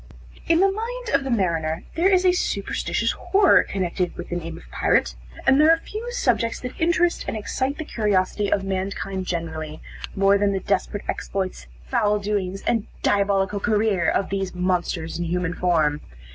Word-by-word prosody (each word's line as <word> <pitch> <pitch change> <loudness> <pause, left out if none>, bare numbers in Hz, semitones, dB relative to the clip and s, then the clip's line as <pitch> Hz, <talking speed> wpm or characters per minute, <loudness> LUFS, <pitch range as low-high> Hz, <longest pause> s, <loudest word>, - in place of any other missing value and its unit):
In 330 +1 +4
the 390 0 +4
mind 470 +4 -4
of - - +3
the 270 - -4
mariner, 170 -7 0
there 345 +4 +3
is 370 -1 +3
a 365 - +6
superstitious 360 - -1
horror 390 -1 +4
connected 180 -2 -2
with - - -7
the 175 - -3
name 165 -1 -5
of - - -13
Pirate; - - +2 0.3
and 270 +2 +5
there 310 - +6
are 330 - +6
few 440 +8 -6
subjects 230 - 0
that 250 +4 -7
interest 345 +1 +2
and - - -2
excite 260 +6 -2
the 315 - -5
curiosity 205 -4 0
of 195 - +2
mankind 190 0 -3
generally, 160 -2 -4 0.4
more 195 +1 +4
than 200 -1 +2
the 195 - 0
desperate 200 +1 -1
exploits, 185 - -3 0.2
foul 210 - +2
doings, 200 -2 -2
and 230 -3 0 0.2
diabolical 200 0 +2
career 210 -5 +2
of 195 - 0
these 195 -2 -2
monsters 180 -2 -1
in 175 - -1
human 180 +1 -1
form. 155 -5 +1
195 Hz, 175 wpm, -23 LUFS, 180-260 Hz, 0.4 s, a